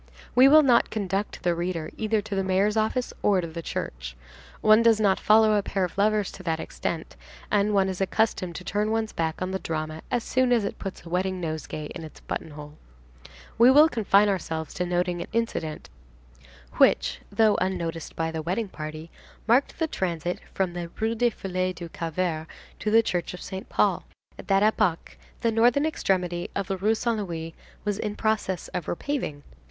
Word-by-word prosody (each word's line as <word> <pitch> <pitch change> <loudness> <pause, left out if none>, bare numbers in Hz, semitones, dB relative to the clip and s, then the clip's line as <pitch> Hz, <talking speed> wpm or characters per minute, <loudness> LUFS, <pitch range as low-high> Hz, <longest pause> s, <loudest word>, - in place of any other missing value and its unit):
We 255 +2 +7
will 305 +2 +8
not 245 -4 +4
conduct 200 -1 -3
the 175 - +2
reader 170 -2 -3
either 220 -1 0
to 205 - -6
the 195 0 0
mayor's 190 +3 +2
office 220 +3 0
or 200 -2 +3
to 175 - -2
the 165 0 -6
church. - - -5 0.4
One 215 +1 +6
does 230 -2 +4
not 200 -3 +3
follow 215 0 +5
a 205 - +3
pair 195 -1 -2
of 180 - -3
lovers 210 0 +2
to - - -11
that 165 -3 -1
extent, 160 0 -4 0.4
and 205 0 +3
one 195 -2 +3
is 190 0 -4
accustomed 190 -3 0
to - - -6
turn 210 +3 -1
one's 220 0 -1
back 160 +2 -2
on 185 - -3
the 190 - -2
drama 155 -1 -4
as 240 -2 0
soon 255 -1 +1
as 230 -4 +3
it - - -5
puts 195 -2 -7
a - - -9
wedding 185 +1 -1
nosegay 155 -2 -4
in 170 - -7
its 155 - -11
buttonhole. 150 -1 -7 0.8
We 240 +2 +8
will 295 +4 +8
confine 210 -6 +3
ourselves 160 -5 -2
to 180 - -2
noting 175 0 0
an - - -5
incident 195 -9 -2 0.9
which, - - +3
though 220 -2 +4
unnoticed 170 -3 -3
by 165 0 -1
the 160 -1 -3
wedding 190 +6 -2
party, 155 0 -7 0.4
marked 245 +5 +3
the 325 - +1
transit 175 - -2
from 185 -2 -1
the 175 -1 -5
Rue 220 +1 +1
des 240 +1 +2
Filles 185 -3 -3
du 170 -1 -7
Calvaire 165 -1 -2 0.3
to 215 - -1
the 225 +1 +5
church 180 -4 -2
of 180 - -11
Saint 190 +4 -7
Paul. - - +2 0.4
At - - -10
that 195 0 +3
epoch, 210 -5 +1 0.3
the 230 - +2
northern 240 +6 +3
extremity 180 - -1
of 200 - -1
the 195 - -2
Rue 210 +4 +2
Saint 230 0 0
Louis 165 -4 -5 0.3
was 205 0 -1
in 210 -1 -3
process 215 -5 -1
of 180 -4 -4
repaving. 175 - -3
190 Hz, 190 wpm, -26 LUFS, 170-220 Hz, 0.9 s, will